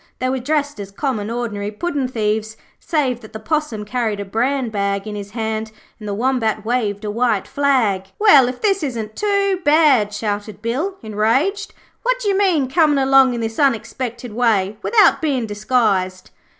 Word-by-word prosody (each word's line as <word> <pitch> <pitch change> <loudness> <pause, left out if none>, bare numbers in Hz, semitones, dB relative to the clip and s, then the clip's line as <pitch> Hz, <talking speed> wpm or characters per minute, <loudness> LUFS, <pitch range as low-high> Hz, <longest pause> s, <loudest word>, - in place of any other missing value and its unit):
They 255 - -1
were 260 0 -1
dressed 290 +1 -1
as 200 -1 -6
common 215 -1 -3
ordinary 225 -4 -3
puddin' 275 +4 -2
thieves, 220 -2 -2 0.2
save 275 -7 -1
that 215 0 -13
the 220 - -6
Possum 300 -5 -2
carried 220 -2 -2
a 200 - -4
bran 245 +4 -1
bag 200 -1 -1
in 210 - -5
his 205 -1 -6
hand 220 0 -3 0.3
and 210 - -8
the 205 - -2
Wombat 225 -3 0
waved 220 -4 -1
a 210 - -2
white 230 -2 0
flag. 255 -9 +1
'Well, 295 - +6
if 250 0 -5
this 395 -3 +2
isn't 225 -7 -4
too 400 -2 0
bad,' 290 -8 +4
shouted 210 0 -4
Bill, 275 - -2
enraged. 245 - 0 0.3
'What - - 0
d'you 405 -4 +1
mean, 365 -9 +2
comin' 300 +1 +3
along 270 -2 +4
in 235 - -3
this 225 0 -4
unexpected 245 -3 -1
way 215 -3 +1
without 430 -4 +4
bein' 275 -7 0
disguised?' 205 -4 0
240 Hz, 170 wpm, -19 LUFS, 210-285 Hz, 0.3 s, Well